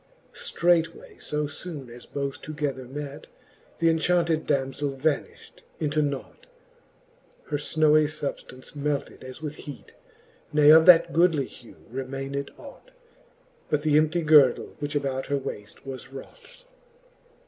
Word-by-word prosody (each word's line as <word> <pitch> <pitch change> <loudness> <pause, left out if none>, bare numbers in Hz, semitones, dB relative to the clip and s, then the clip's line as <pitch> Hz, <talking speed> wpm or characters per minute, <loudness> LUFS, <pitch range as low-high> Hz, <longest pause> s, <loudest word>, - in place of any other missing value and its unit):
Streight 175 - +1
way 455 -3 -15
fb 150 0 -2 0.2
foone 155 -7 -7
as 120 +1 -12
both 140 -1 -4
together 145 -4 -4
met, 145 +3 -7 0.5
Th'enchaunted 165 0 +2
damzell 135 0 -1
vanifht 150 +1 -3 0.2
into 155 -1 +1
nought; 140 - -4 1.0
Her 145 - +1
ihowy 155 +1 +3
fubftance 145 -3 -6
melted 145 -1 -3
as 130 +4 -10
with 150 -1 -5
heat, 145 - -10 0.6
Ne 150 0 +6
of 160 +2 +7
that 175 -2 +7
goodly 165 -4 +3
hew 120 -1 -15 0.2
remayned 135 +1 -4
ought. 290 - -13 0.8
But 150 - +1
th'emptie 155 +2 +2
girdle, 150 -5 +5
which 145 0 -4
about 135 -2 -1
her 140 - 0
waft 105 -5 -8
was 135 -1 -8
wrought. 485 - -13
150 Hz, 125 wpm, -26 LUFS, 135-160 Hz, 1.0 s, of